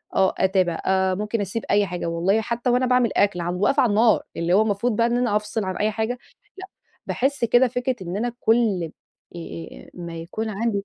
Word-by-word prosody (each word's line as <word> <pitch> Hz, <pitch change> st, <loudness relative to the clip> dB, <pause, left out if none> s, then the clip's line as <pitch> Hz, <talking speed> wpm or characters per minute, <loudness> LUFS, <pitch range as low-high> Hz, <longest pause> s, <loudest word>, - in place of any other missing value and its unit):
آه 190 Hz, -1 st, +3 dB
أتابع، 185 Hz, -3 st, +1 dB
آآ 190 Hz, 0 st, +2 dB
ممكن 210 Hz, +3 st, -2 dB
أسيب 205 Hz, +3 st, -4 dB
أي 205 Hz, 0 st, +4 dB
حاجة 180 Hz, -2 st, -5 dB
والله 175 Hz, +6 st, +1 dB
حتى 235 Hz, +2 st, -2 dB
وأنا 250 Hz, +1 st, +3 dB
باعمل 250 Hz, -2 st, +3 dB
أكل 200 Hz, -3 st, +2 dB
عند 175 Hz, +2 st, -3 dB
واقفة 275 Hz, +6 st, +3 dB
على 245 Hz, -, +2 dB
النار، 220 Hz, +2 st, +3 dB
اللي 170 Hz, +1 st, 0 dB
هو 200 Hz, -, +5 dB
المفروض 220 Hz, +2 st, 0 dB
بقى 230 Hz, +2 st, +3 dB
إن 240 Hz, 0 st, 0 dB
أنا 240 Hz, -4 st, +1 dB
أفصِل 210 Hz, +1 st, -1 dB
عن 185 Hz, -1 st, -3 dB
أي 215 Hz, +1 st, +1 dB
حاجة، 220 Hz, +1 st, -2 dB
لأ، -, -, -10 dB, 0.9 s
باحس 270 Hz, 0 st, 0 dB
كده 245 Hz, +2 st, +4 dB
فكرة 250 Hz, +1 st, -2 dB
إن 180 Hz, +1 st, -4 dB
أنا 240 Hz, +3 st, -1 dB
كُل 210 Hz, -8 st, +1 dB, 0.4 s
آآ 85 Hz, -, -9 dB
ما 170 Hz, -2 st, -7 dB
يكون 190 Hz, +7 st, -5 dB
عندي 210 Hz, -1 st, -1 dB
210 Hz, 205 wpm, -23 LUFS, 185-235 Hz, 0.9 s, هو